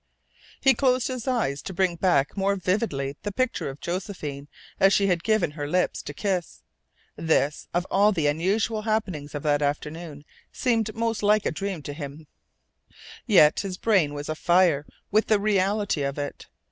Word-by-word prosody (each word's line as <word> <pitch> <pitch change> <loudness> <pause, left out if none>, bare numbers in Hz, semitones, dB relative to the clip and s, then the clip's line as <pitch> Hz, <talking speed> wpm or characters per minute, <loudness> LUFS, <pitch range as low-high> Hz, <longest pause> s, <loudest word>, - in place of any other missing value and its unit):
He 270 - +5
closed 255 0 +1
his 255 -1 -5
eyes 230 - 0
to 190 - -7
bring 185 -1 +1
back 165 -6 +1
more 200 0 +1
vividly 180 -8 -1
the 205 - -4
picture 255 - -1
of 135 +1 -9
Josephine 170 -6 -5 0.3
as 195 0 +5
she 200 - +3
had 175 -3 +1
given 215 -8 +2
him - - -18
her 145 -1 -3
lips 180 +4 0
to - - -7
kiss. 180 +2 -3 0.5
This, 150 -2 0
of 175 +1 0
all 205 +2 +4
the 165 -7 -1
unusual 195 +9 +1
happenings 190 -10 -2
of 145 - -4
that 145 -1 +2
afternoon, 150 +1 -4 0.3
seemed 225 -3 0
most 230 -1 -1
like 210 0 +3
a - - +1
dream 185 -1 -4
to 145 - -5
him, 145 +1 -8 1.0
yet 165 -9 +6
his 190 -2 -4
brain 180 -11 +2
was 145 0 -5
afire 160 -2 +2 0.2
with 215 +2 +3
the 215 -2 +3
reality 200 -3 +1
of 140 0 -2
it. 145 0 -5
185 Hz, 170 wpm, -25 LUFS, 150-210 Hz, 1.0 s, yet